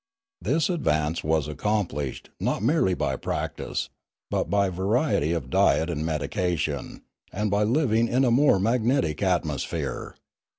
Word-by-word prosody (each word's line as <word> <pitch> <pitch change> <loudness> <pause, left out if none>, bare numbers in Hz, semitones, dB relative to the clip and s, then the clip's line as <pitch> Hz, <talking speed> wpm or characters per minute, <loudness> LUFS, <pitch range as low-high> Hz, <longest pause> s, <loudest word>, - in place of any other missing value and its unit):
This 155 +3 +1
advance 80 - 0
was 80 -1 +1
accomplished, 75 -4 -2
not - - -1
merely 120 - +2
by - - -1
practice, - - -3 0.4
but - - 0
by 100 -1 +2
variety 95 - +1
of 70 -7 -3
diet 80 +2 +3
and 75 -2 -2
medication, 80 -1 -2 0.3
and 105 +1 -1
by 100 +1 +2
living 115 0 +2
in 130 +3 +2
a 120 - +3
more 130 -5 +4
magnetic 115 - +1
atmosphere. 85 -7 -2
95 Hz, 130 wpm, -25 LUFS, 80-115 Hz, 0.4 s, more